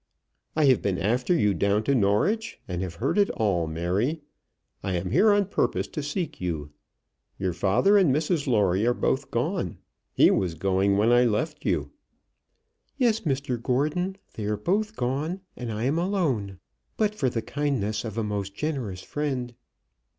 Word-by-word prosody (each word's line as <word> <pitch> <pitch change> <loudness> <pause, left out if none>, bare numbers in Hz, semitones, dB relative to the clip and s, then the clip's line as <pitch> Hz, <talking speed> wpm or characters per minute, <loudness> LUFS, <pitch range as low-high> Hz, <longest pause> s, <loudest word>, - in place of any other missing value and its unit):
"I 155 - +3
have 130 -3 +4
been 95 -3 0
after 120 - 0
you 105 -8 +3
down 100 +2 +1
to 140 - +1
Norwich, 130 - +1
and 90 -1 -3
have 90 -3 -4
heard 145 - 0
it 200 - +4
all. 95 -7 0
Mary, 95 - -1 0.6
I 95 - -2
am 90 +1 -2
here 205 - +5
on 205 0 +3
purpose 195 - 0
to 155 - -4
seek 150 - -4
you. 80 -5 -3 0.7
Your 95 -2 -1
father 120 - +3
and 180 -8 +4
Mrs 150 +1 0
Lawrie 100 -5 +2
are 120 - +2
both 135 0 0
gone. 145 - -2 0.3
He - - +5
was 90 -4 0
going 95 +3 +2
when 110 +3 +3
I 120 +1 +5
left 150 +8 -1
you." - - 0 1.1
"Yes, 235 -4 +3
Mr 135 - -2
Gordon. 150 +10 0 0.2
They 105 - -5
are 105 0 0
both 210 - 0
gone, 150 - -2
and 120 -2 -5
I 110 +1 -3
am 140 +6 +1
alone, 145 - -1 0.4
but 215 -1 +1
for 140 -11 0
the 115 -2 -3
kindness 125 -8 -1
of 115 -2 -6
a 115 - 0
most 100 -2 -3
generous 125 -12 -3
friend." 130 -5 -3
120 Hz, 170 wpm, -26 LUFS, 100-155 Hz, 1.1 s, here